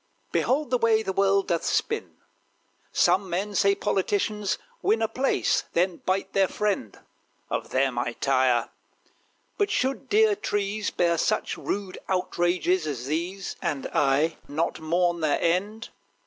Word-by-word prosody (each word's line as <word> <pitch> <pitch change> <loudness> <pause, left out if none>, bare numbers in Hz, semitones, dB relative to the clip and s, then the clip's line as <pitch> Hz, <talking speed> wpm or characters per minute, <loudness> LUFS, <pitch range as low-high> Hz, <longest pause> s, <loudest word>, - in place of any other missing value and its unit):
Behold 270 0 +1
the 250 - +2
way 220 -1 +3
the 190 - -2
world 195 0 +2
doth 170 -1 0
spin. - - -1 0.7
Some 190 0 +2
men 195 +4 -2
say, 200 0 +3
politicians 205 +1 0 0.2
win 225 - +2
A 225 - +1
place: 265 +4 +1
then 180 0 +1
bite 190 +1 -2
their 195 -1 +3
friend! 200 - -2 0.5
Of - - -2
them 130 -2 +1
I 120 -1 -2
tire. 130 -3 +2 0.9
But 410 -1 +2
should 270 -8 -1
dear 430 0 +4
trees 205 - -2
Bear 170 -2 +1
such - - 0
rude 195 -2 -4
outrages 180 -2 +1
as 130 -5 -4
these, 175 +7 -3
And 140 -3 -2
I 145 +4 +2
not 160 +4 -2
mourn 170 +2 +1
their 155 -3 +1
end? 200 +7 -1
185 Hz, 140 wpm, -26 LUFS, 160-210 Hz, 0.9 s, dear